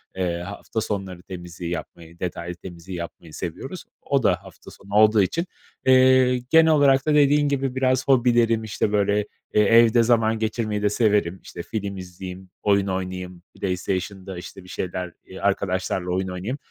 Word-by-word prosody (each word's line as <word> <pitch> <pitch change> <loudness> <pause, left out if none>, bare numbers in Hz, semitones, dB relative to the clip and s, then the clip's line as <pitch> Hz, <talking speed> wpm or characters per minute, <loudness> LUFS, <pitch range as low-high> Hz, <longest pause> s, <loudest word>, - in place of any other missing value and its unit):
Eee, 90 -2 -1
hafta 100 +4 -5
sonları 95 -4 -4
temizliği 90 -2 -7
yapmayı, 85 0 -7
detaylı 90 -1 -4
temizliği 90 +1 -9
yapmayı 85 -1 -8
seviyoruz, - - -6 0.2
o - - 0
da - - +2
hafta - - -14
sonu 100 +1 -13
olduğu 110 0 +6
için. 165 - 0 0.4
Eee, 130 -1 +5
genel 160 0 +6
olarak 140 -3 +4
da 155 - +2
dediğin 145 0 +4
gibi 135 -2 -1
biraz 130 -1 +1
hobilerim, 120 -3 +3
işte, 105 -1 -1
böyle, 100 -1 +2 0.4
eee, 105 - +5
evde 115 +2 +5
zaman 115 -1 +2
geçirmeyi 110 -1 -1
de 105 - +2
severim, 105 -5 +1
işte, 85 - -8
film 100 -3 -4
izleyeyim, 90 0 -9
oyun 100 -1 +2
oynayayım, 90 -1 -4
PlayStation’da, 95 0 -3
işte, 90 +2 -9
bir 90 - -15
şeyler, 90 -1 -4
eee, 95 - -10
arkadaşlarla 95 -2 -1
oyun 95 +1 -1
oynayayım. 95 +8 -4
100 Hz, 160 wpm, -23 LUFS, 90-115 Hz, 0.4 s, olduğu